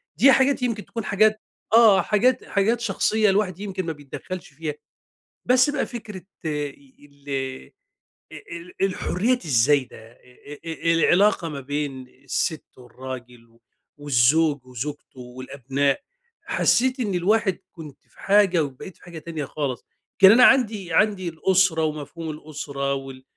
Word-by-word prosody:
دي 275 - +6
حاجات 270 +1 +3
يمكن 230 -4 -2
تكون 230 -2 -6
حاجات 215 +2 +2 0.3
آه 225 -4 +7
حاجات 230 +4 +1
حاجات 215 +4 +1
شخصية 215 0 +1
الواحد 195 -2 0
يمكن 195 -3 -4
ما 165 - -3
بيتدخلش 150 +5 -8
فيها. 155 0 -4 0.7
بس 255 +2 +4
بقى 290 -1 -1
فكرة 215 -6 -8 0.2
إي 145 -3 -5 0.2
ال 135 - -6 0.6
أ - - -10 0.2
ال 170 +1 -9
الحرّيات 195 +4 0
الزايدة، 135 -1 +2
أ 120 - -23 0.3
أ 145 - -8 0.3
أ 165 - +5
العلاقة 175 +1 +3
ما 145 - -6
بين 140 -2 -4 0.2
الست 155 +4 -2
والراجل 125 -1 -10
و 115 +1 -28 0.4
والزوج 145 +1 +2
وزوجته 130 +2 -7
والأبناء، 135 - -2 0.4
حسّيت 260 +2 +2
إن 205 -6 -1
الواحد 195 +2 +1
كنت 155 -5 -11
في - - -25
حاجة 195 -5 +3
وبقيت 140 +6 -9
في - - -23
حاجة 170 -2 -9
تانية 155 -2 -5
خالص. 135 -3 -4 0.3
كان 195 0 +9
أنا 245 +3 +6
عندي 215 -9 +2
عندي 195 -1 +2
الأسرة 170 0 +2
ومفهوم 155 +1 -4
الأسرة 145 -2 -4
وال 135 -1 -7
165 Hz, 140 wpm, -23 LUFS, 140-205 Hz, 0.7 s, كان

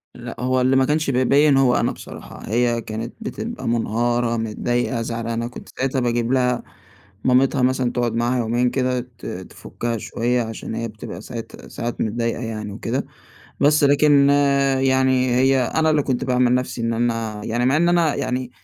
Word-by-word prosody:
لأ، 120 -1 -8
هو 130 +1 +1
اللي 130 +1 +3
ما 130 0 +4
كانش 150 +1 0
بيبيّن 135 +3 +4
هو 130 -2 +4
أنا - - +1
بصراحة. - - -10
هي 120 +1 +1
كانت 110 +2 -6
بتبقى 230 +1 -5
مُنهارة، 120 +1 0
متضايقة، 120 +2 -1
زعلانة. 115 0 -3
كنت 125 - -11
ساعتها 135 0 0
باجيب 120 0 0
لها 125 -2 +1 0.6
مامتها 130 +1 +3
مثلًا 130 -1 +1
تقعُد 120 -2 -1
معاها 120 +2 +1
يومين 120 +1 +1
كده 125 0 0 0.2
ت - - -9
تفُكّها 115 +5 -5
شوية 120 +3 -1
عشان 115 0 -6
هي 115 +1 -3
بتبقى 110 0 -8
ساعات 115 -2 -9
ساعات 120 0 -4
متضايقة 115 +2 -1
يعني 110 -3 -5
وكده. - - -3 0.5
بس 150 +1 +4
لكن 145 0 +5 0.5
يعني 130 -1 +2
هي 130 +1 +3
أنا 160 +3 +1
اللي 150 -1 +2
كنت 130 -3 -1
باعمل 125 -1 +2
نَفسي 125 -1 -2
إن 115 0 0
أنا 115 -2 -2
يعني 120 +2 0
مع 135 +3 +3
إن 170 +2 +3
أنا 170 -4 +3
يعني 125 0 -2
125 Hz, 165 wpm, -21 LUFS, 115-130 Hz, 0.6 s, لكن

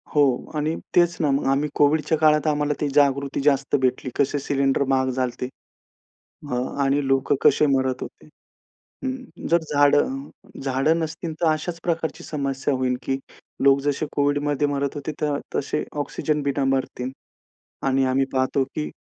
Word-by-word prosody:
हो 145 - +6 0.3
आणि 155 +2 0 0.2
तेच 175 -1 +4
ना 150 - +2
मग, 135 - 0
आम्ही 145 +2 +1
कोव्हिडच्या 150 +2 +3
काळात 155 0 +3
आम्हाला 150 0 +1
ती 150 - +1
जागृती 140 -1 +2
जास्त 140 0 +2
भेटली. 130 0 0
कसे 145 +1 +1
सिलिंडर 135 0 +1
महाग 130 -1 +2
झालते. 125 -1 -2 1.1
हा 125 - 0 0.3
आणि 140 0 +1
लोक 135 +1 +2
कसे 150 - +5
मरत 130 -1 -1
होते. - - -9 0.8
हं. 260 0 -1 0.3
अ, - - -3
जर 170 - +5 0.2
झाडं 145 - +3 0.4
झाडं 135 +5 +2
नसतील, 160 0 -4
तर 165 - +3
अशाच 165 +2 -3
प्रकारची 165 -2 -2
समस्या 140 -2 -2
होईल 130 -1 0
की 135 0 -1 0.5
लोक 140 0 +6
जसे 145 +2 -1
कोव्हिडमध्ये 145 0 +1
मरत 140 0 -2
होते, 145 +2 -4
तर 145 -1 0 0.2
तसे 150 +2 -1 0.2
ऑक्सिजन 150 +1 -2
बिना 140 0 0
मरतील 130 -1 -1 0.8
आणि 135 0 +2
आम्ही 130 +1 +2
पाहतो 130 +1 +1
की 150 - -2
145 Hz, 155 wpm, -23 LUFS, 135-150 Hz, 1.1 s, हो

